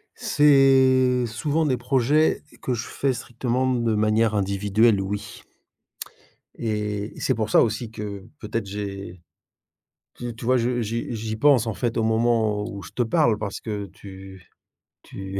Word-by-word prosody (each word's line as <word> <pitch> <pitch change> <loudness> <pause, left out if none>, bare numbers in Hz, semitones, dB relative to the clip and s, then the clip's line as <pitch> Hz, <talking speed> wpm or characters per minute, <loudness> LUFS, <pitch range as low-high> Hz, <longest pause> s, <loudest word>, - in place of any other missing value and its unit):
C'est 130 -3 +4
souvent 145 +8 -1
des 130 - +1
projets 135 +5 +2 0.2
que 125 - -1
je 115 -1 -3
fais 135 -1 -1
strictement 125 +2 -2
de 115 -2 0
manière 110 +1 +2
individuelle, 100 +2 +2
oui. 100 +1 -5 1.1
Et 105 -2 -3
et - - -10
c'est 130 - +1
pour 110 -1 -2
ça - - +5
aussi 110 0 -1
que 100 -3 -7
peut-être 110 0 -3
j'ai 100 -3 -6 0.9
tu 120 -2 -6
tu 115 - -9
vois, 130 +2 +3
je 120 0 0
j'y 115 +2 -3
j'y 110 0 -4
pense, 130 -3 +4
en 110 - -1
fait, 120 +1 -2
au 115 - +1
moment 110 -2 +1
où 100 -3 -8
je - - -11
te - - -2
parle 120 -3 +2
parce 100 -2 -5
que 105 -3 -4
tu 95 0 -12 0.6
tu 95 0 -7
115 Hz, 155 wpm, -24 LUFS, 105-125 Hz, 1.1 s, ça